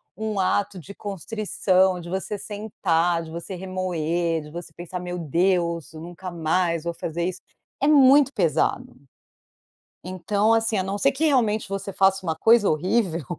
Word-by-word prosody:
um 215 -1 -3
ato 195 +1 0
de 195 +5 -11
constrição, 190 -2 0
de 170 - -9
você 190 +3 -3
sentar, 175 -5 -1
de 160 - -10
você 170 +3 -7
remoer, 175 -3 -2
de 150 - -11
você 170 +1 -8
pensar: 175 +1 -7
"Meu 180 0 -5
Deus, 170 0 0
nunca 175 +3 -8
mais 170 0 0
vou 170 - -2
fazer 170 +1 -3
isso". 185 0 -4 0.4
É 285 - +2
muito 280 -1 +6
pesado. - - 0 1.1
Então 205 +4 +1
assim, 225 -1 +1
a 190 - +1
não 195 +2 -3
ser 275 +5 +3
que 295 +4 -2
realmente 230 -8 +2
você 195 0 -4
faça 190 -1 +2
uma 160 - -1
coisa 225 +3 +4
horrível, 170 - 0
185 Hz, 155 wpm, -24 LUFS, 170-205 Hz, 1.1 s, muito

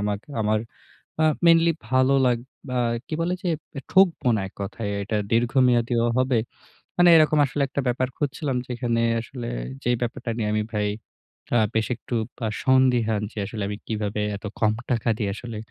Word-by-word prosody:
আমাকে 105 +4 -3
আমার 105 0 +1 0.6
আ - - +5 0.2
mainly 165 0 +6 0.2
ভালো 130 +1 +3
লাগ 120 -2 +3 0.4
আ - - +2 0.3
কি - - -6
বলে 175 +2 0
যে? - - -1 0.4
ঠকবো 180 -8 +4
না 105 - -1
এক - - -16
কথায় 100 +2 -4
এটা 110 +2 -3 0.2
দীর্ঘমেয়াদীও 120 0 +3
হবে। 130 -2 +2 0.6
মানে 175 0 +6
এরকম 155 -1 +5
আসলে 140 +2 -3
একটা 140 +1 -2
ব্যাপার 125 +1 +1
খুঁজছিলাম 135 -2 -2
যেখানে 120 -2 -1 0.2
আসলে 120 0 -7 0.4
যে 120 - 0
ব্যাপারটা 120 0 -3
নিয়ে 105 -2 -1
আমি 110 - +1
ভাই 105 -1 0 0.7
আ - - +5 0.2
বেশ 110 0 +1
একটু 120 - -9 0.3
আ - - -1
সন্দিহান 125 -5 +3
যে - - -18
আসলে 105 0 -5
আমি 105 0 -4
কিভাবে 105 -1 -2 0.2
এত 105 - -11
কম 110 -1 +3 0.2
টাকা 115 -1 +1
দিয়ে 105 -3 -1
আসলে 115 -1 -7
120 Hz, 170 wpm, -24 LUFS, 110-130 Hz, 0.7 s, mainly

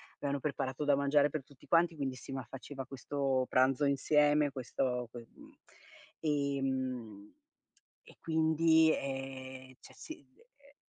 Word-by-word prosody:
avevano 140 0 -2
preparato 135 -1 -3
da 145 -1 +4
mangiare 140 +1 +3
per 150 -2 -4
tutti 140 -2 -20
quanti 170 0 +3
quindi 135 -3 -3
sì, 130 - -10
ma 135 -1 -4
faceva 135 +2 -8
questo 135 0 -1
pranzo 130 +2 +3
insieme, 145 +1 +3
questo 125 -1 -2
que 120 -1 -10
mhmm, - - -15 0.7
ehm, 130 -7 -2 0.7
e - - -18
quindi 160 0 +4
ehm, 130 -1 -6
cioè - - -15
sì 315 -2 -10
e 290 - -25
140 Hz, 130 wpm, -33 LUFS, 130-150 Hz, 0.7 s, da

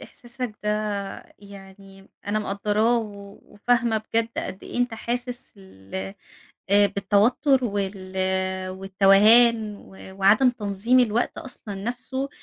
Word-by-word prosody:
إحساسك 245 -3 -8
ده - - 0 0.7
يعني، 195 -1 -14 0.2
أنا 210 +1 0
مقدراه 210 +3 +1
و 200 -2 -8
وفاهمة 230 +1 0
بجد 230 0 +1
قد 190 - -5
إيه - - -6
أنت 245 -2 0
حاسس 245 +2 -4
ال 95 - -16 0.8
آآ 205 0 +6
بالتوتر 210 +7 +2
وال 195 -3 -4 0.6
والتوهان 205 +4 +4
و 190 -1 -14
وعدم 220 +7 +5
تنظيم 225 +2 +1
الوقت 235 -1 0
أصلًا 220 -5 -8
نفسه، 245 +6 -4
210 Hz, 110 wpm, -24 LUFS, 195-240 Hz, 0.8 s, آآ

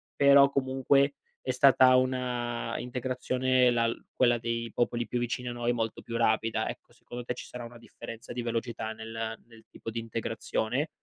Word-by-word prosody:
però 140 0 +7
comunque 140 +1 +2 0.3
è 130 - -2
stata 130 0 +6
una 125 -2 -1
integrazione 125 0 +1
la 115 -1 +2 0.2
quella 120 -2 +3
dei 115 0 -3
popoli 120 -1 0
più 125 - -1
vicini 120 +1 -2
a - - -4
noi, 120 0 0
molto 115 -2 -3
più 115 0 -4
rapida, 110 -1 +1
ecco, - - -9
secondo 120 0 -9
te, 125 - -3
ci - - -8
sarà 125 -1 -8
una 120 +1 -10
differenza 115 -1 -9
di 120 - -3
velocità 115 -1 -3
nel 110 0 -5
nel 115 -1 -17
tipo 115 - -8
di 115 - -3
integrazione? 115 +4 -2
120 Hz, 170 wpm, -29 LUFS, 115-130 Hz, 0.3 s, però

